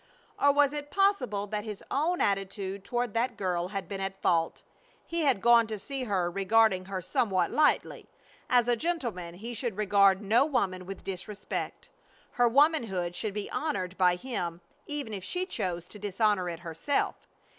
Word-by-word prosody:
Or 285 - +5
was 285 0 +3
it 290 -1 -5
possible 290 - +1
that 210 0 -3
his 210 -2 -7
own 325 +6 +1
attitude 195 0 -1
toward 240 0 -2
that 235 0 0
girl 180 -2 -1
had 195 -2 -5
been 195 +1 -5
at 195 0 -4
fault? 165 -1 +1 0.4
He 335 0 -2
had 250 -9 +2
gone 235 -1 +6
to 215 -1 -4
see 265 +5 -5
her 185 -5 0
regarding 195 0 +3
her 190 -1 -4
somewhat 185 -5 +1
lightly. 300 -1 +1 0.4
As 245 -1 +4
a 240 - +3
gentleman 235 - -3
he 230 +6 -7
should 230 -3 -3
regard 200 -2 +4
no 220 +5 +3
woman 190 -11 -1
with 195 0 -7
disrespect. 195 +2 -5 0.4
Her 245 -1 +3
womanhood 230 - +2
should 210 0 -3
be 210 - -3
honored 190 - -2
by 180 -2 +4
him 175 -6 -4 0.3
even 290 -7 -4
if 195 -3 -5
she 360 - -2
chose 175 - -3
to 210 - -11
dishonor 205 -2 +1
it 170 -1 -6
herself. 170 - -2
205 Hz, 170 wpm, -29 LUFS, 185-245 Hz, 0.4 s, gone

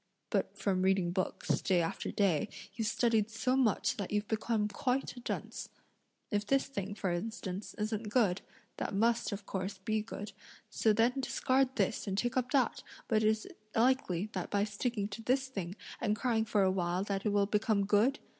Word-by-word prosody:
But 200 0 0
from 195 -2 +1
reading 190 -2 +3
books, 185 +1 -1
day 185 -2 +3
after 165 -1 -2
day, 185 -8 +2 0.2
you've 225 0 -1
studied 225 -2 +2
so 255 +3 0
much 250 -1 +2
that 200 -3 -3
you've 210 0 0
become 220 -1 0
quite 250 +7 -1
a - - -8
dunce. 240 - -4 0.6
If 205 -1 +1
this 275 +3 +3
thing, 205 -7 -4
for 195 -3 -1
instance, 195 +1 -4
isn't 215 0 -2
good, 205 -6 +2 0.4
that - - -2
must, 230 +3 +2
of 200 -1 -5
course, 190 +1 -3
be 215 +3 -1
good, 210 -1 -6 0.4
so 220 - +3
then 235 +5 +3
discard 265 0 +1
this 225 - 0
and 195 0 -1
take 240 +3 0
up 250 -1 +1
that, 260 -4 +2 0.3
but 215 -1 +3
is 220 0 +2
it - - -13 0.2
likely 225 -7 +2
that - - -3
by 200 0 +2
sticking 210 0 -1
to 205 +2 -6
this 260 +3 +1
thing 190 -6 -4 0.2
and 210 -2 +1
crying 225 -2 +1
for 210 -2 +2
a 190 - +4
while 180 0 0
that 200 -1 -2
it 215 - +2
will 205 -1 +3
become 210 0 +2
good? 215 +8 +3
210 Hz, 190 wpm, -33 LUFS, 195-235 Hz, 0.6 s, a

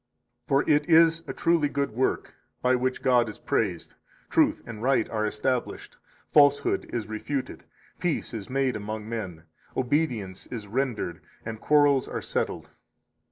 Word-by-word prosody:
For 135 +1 +2
it 150 +1 +3
is 165 0 +6
a - - -4
truly 165 -3 +2
good 140 0 -1
work, 125 +4 -1 0.3
by 125 0 +4
which 130 0 -1
God 120 -3 +4
is 105 - -8
praised, - - -2 0.4
truth - - +3
and 110 -2 -8
right 130 -2 +2
are 110 -1 0
established, 120 +4 -2 0.4
falsehood 145 -1 +4
is 115 -3 -2
refuted, 125 +6 -4 0.3
peace 175 -7 -1
is 105 -4 -6
made 135 -1 0
among 110 0 -5
men, 95 -8 -5 0.3
obedience 125 - -1
is 115 -4 -6
rendered, 110 -6 -2 0.2
and 110 -1 -6
quarrels 145 -3 +4
are - - -4
settled. - - -3
125 Hz, 145 wpm, -26 LUFS, 110-145 Hz, 0.4 s, is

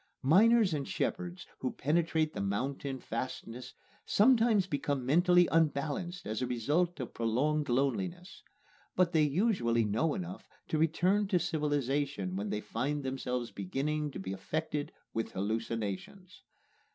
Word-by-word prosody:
Miners 205 - +5
and 140 -3 -2
shepherds 180 0 -3
who 130 - -2
penetrate 160 +1 +1
the - - -3
mountain 130 +7 -2
fastnesses 125 +1 -6 0.3
sometimes 225 -3 +4
become 140 -5 -2
mentally 175 +5 +5
unbalanced 165 +3 0
as 110 +2 -3
a 125 - 0
result 150 +9 0
of 125 - -5
prolonged 140 +7 0
loneliness. 175 +8 -1 0.5
But 180 -2 +3
they 160 -2 +3
usually 145 - +2
know 115 +10 +1
enough 185 0 -6 0.2
to 155 - 0
return 180 +6 +2
to 190 -2 +2
civilization 145 - -1
when 100 +2 -3
they 105 - -2
find 140 +7 -2
themselves 125 -2 -3
beginning 145 +10 -2
to - - -5
be 95 0 -4
affected 150 +9 -3 0.2
with 115 - -3
hallucinations. 110 - -4
145 Hz, 130 wpm, -32 LUFS, 120-175 Hz, 0.5 s, Miners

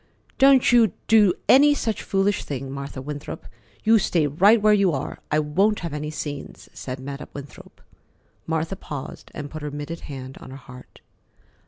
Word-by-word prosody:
"Don't 270 -2 +6
you 230 -5 +5
do 210 -5 +5
any 290 +2 +6
such 225 -6 -2
foolish 195 +1 0
thing, 135 -1 -5
Martha 140 -1 -6
Winthrop. 145 +1 -7 0.4
You 225 0 +5
stay 170 -5 +1
right 195 +11 +4
where 210 0 +4
you 200 -3 +3
are. 135 0 -4
I 155 - +1
won't 190 +8 +1
have 170 -4 -5
any 150 0 -4
scenes," 145 -2 -7
said 130 0 -6
Madam 140 +2 -7
Winthrop. 140 -2 -11 0.7
Martha 160 +3 -1
paused 145 -7 -8
and 145 -2 -6
put 155 - -7
her 150 - -4
mitted 145 +3 -6
hand 130 -2 -9
on - - -11
her 135 - -9
heart. 125 -1 -14
155 Hz, 170 wpm, -23 LUFS, 140-205 Hz, 0.7 s, Don't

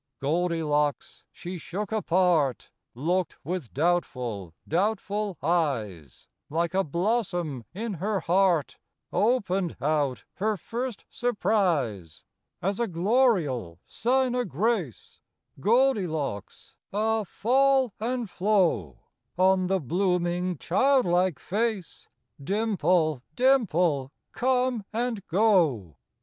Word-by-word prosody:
Goldilocks 150 -1 0
she 180 0 -7
shook 200 +6 -5
apart, 175 - +1 0.2
Looked 175 +6 -1
with 170 -6 -4
doubtful, 125 - -1 0.2
doubtful 205 +1 -1
eyes, 120 - -2 0.2
Like 170 +3 -1
a 195 +1 +2
blossom 175 - -1
in 215 +4 -4
her 205 0 0
heart. 175 -3 +2 0.3
Opened 195 -4 +1
out 140 -5 0
her 215 +2 0
first 235 +5 -5
surprise. 175 - -1 0.4
As 195 +3 -1
a 235 - +1
gloriole 170 - +1
sign 255 +1 +1
o' 250 0 +1
grace, 190 - -2 0.4
Goldilocks, 180 - 0 0.2
ah 220 +2 +1
fall 260 +4 +2
and 240 +1 -2
flow, 180 - +1 0.4
On 185 0 +3
the 190 +1 +1
blooming, 180 +2 0
childlike 180 - +2
face, 210 -2 -3 0.4
Dimple, 180 - +1
dimple, 175 - +2 0.2
come 250 -3 0
and 230 -2 -2
go. 165 - +2
180 Hz, 95 wpm, -27 LUFS, 155-220 Hz, 0.4 s, On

